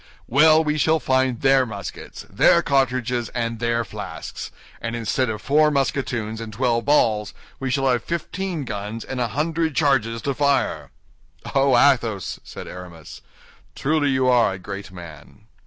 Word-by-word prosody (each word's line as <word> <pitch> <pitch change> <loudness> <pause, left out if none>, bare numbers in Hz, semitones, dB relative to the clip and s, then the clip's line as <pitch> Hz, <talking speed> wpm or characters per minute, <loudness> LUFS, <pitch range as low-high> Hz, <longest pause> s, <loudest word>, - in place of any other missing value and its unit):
"Well, 155 +4 +5
we 150 0 -1
shall 160 +2 +3
find 130 -3 +1
their 135 -1 +4
muskets, 105 -5 -8
their 170 - +4
cartridges, 125 -3 0
and 115 -1 -2
their 115 0 0
flasks; - - -7 0.3
and 115 0 -3
instead 120 +2 -1
of 110 -1 -5
four 150 +2 +4
musketoons 125 -5 -1
and 110 -1 -7
twelve 115 +1 0
balls, 110 -8 +2 0.2
we 135 - -3
shall 135 +2 +1
have 125 -3 +1
fifteen 170 -1 -3
guns 105 0 -5
and 130 -1 -4
a 120 - +1
hundred 160 +5 -1
charges 120 -7 +1
to 140 - 0
fire." 135 - 0 0.6
"Oh, 135 -2 +4
Athos!" 120 -8 +2
said - - -9
Aramis, 90 -3 -10 0.5
"truly 150 0 +1
you 130 -1 +2
are 120 -5 +4
a - - -6
great 100 +1 -8
man." 80 -6 -12
125 Hz, 155 wpm, -22 LUFS, 110-140 Hz, 0.6 s, Well